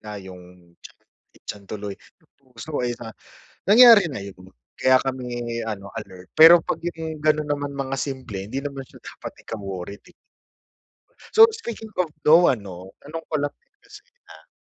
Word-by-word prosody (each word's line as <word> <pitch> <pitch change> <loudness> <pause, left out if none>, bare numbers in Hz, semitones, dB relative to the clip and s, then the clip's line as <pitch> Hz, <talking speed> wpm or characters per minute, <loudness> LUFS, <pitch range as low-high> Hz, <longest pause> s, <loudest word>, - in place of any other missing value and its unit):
Ah, 105 -1 -8
'yung 90 -2 -13
tiyan, - - -14 0.4
ay - - -19
tiyan 100 -1 -8
tuloy, 105 -2 -6
'yung 160 - -26
puso 130 +3 -11
eh 120 - -3
no. 115 -1 -9 0.5
Nangyari 225 -1 +8
na 100 - -6
'yun, 100 -2 -10 0.4
kaya 130 0 +5
kami 120 -3 -4
ano, 100 -3 -6
alert. 90 0 -10
Pero 165 +1 +9
'pag - - -3
'yung 160 -2 -5
ganun 155 -1 +2
naman 145 -1 -2
mga 135 -1 -3
simple, 130 -9 -5
hindi 130 +7 -4
naman 140 -2 -6
siya - - -17
dapat - - -9
ika-worried 100 -2 -7
'di - - -19 1.2
so 445 - +11
speaking 225 - -8
of 175 - 0 0.2
no 165 +3 +6
ano, 95 -5 -4
tanong 160 +2 -7
ko 155 - -6
lang 145 - -2 0.3
kasi, 420 +1 -14 0.3
ah - - -18
130 Hz, 165 wpm, -23 LUFS, 100-160 Hz, 1.2 s, so